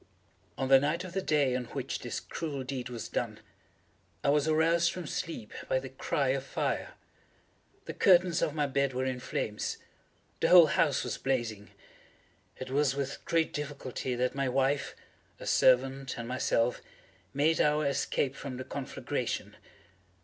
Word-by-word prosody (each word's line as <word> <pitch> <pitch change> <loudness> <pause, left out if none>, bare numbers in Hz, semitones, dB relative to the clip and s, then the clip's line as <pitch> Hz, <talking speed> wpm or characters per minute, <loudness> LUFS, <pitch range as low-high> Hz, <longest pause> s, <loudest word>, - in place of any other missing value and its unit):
On 130 - -1
the 135 0 +7
night 155 +6 0
of 185 -1 -8
the 190 - 0
day 145 -7 +2
on 125 -1 -2
which - - -4
this - - -4
cruel 145 -5 -5
deed 130 -1 -4
was 120 -2 -5
done, - - -3 0.8
I - - +2
was 150 +1 +2
aroused 165 +2 +3
from 180 -2 -6
sleep 145 -6 -5 0.2
by - - +3
the 130 0 -4
cry 135 +1 -1
of 135 0 0
fire. - - -2 0.9
The - - -5
curtains 180 -2 +4
of 150 - 0
my 150 -2 +1
bed 140 -1 0
were 130 +1 0
in 130 -1 -2
flames. 105 -3 -3 0.6
The - - +2
whole 175 -2 +10
house 150 -1 +2
was - - -4
blazing. 115 -6 -2 0.9
It 130 0 -7
was 140 -1 +2
with 140 -1 -4
great 165 -1 +1
difficulty 140 -3 -4
that 125 +1 0
my 135 -1 0
wife, 135 +2 0 0.4
a - - -8
servant, 130 +1 +3
and 115 - -5
myself, 125 -1 +1 0.5
made 155 +4 +2
our 150 0 +2
escape 140 -1 0
from 135 -3 -6
the 130 - -5
conflagration. 135 0 -4
135 Hz, 160 wpm, -30 LUFS, 130-150 Hz, 0.9 s, whole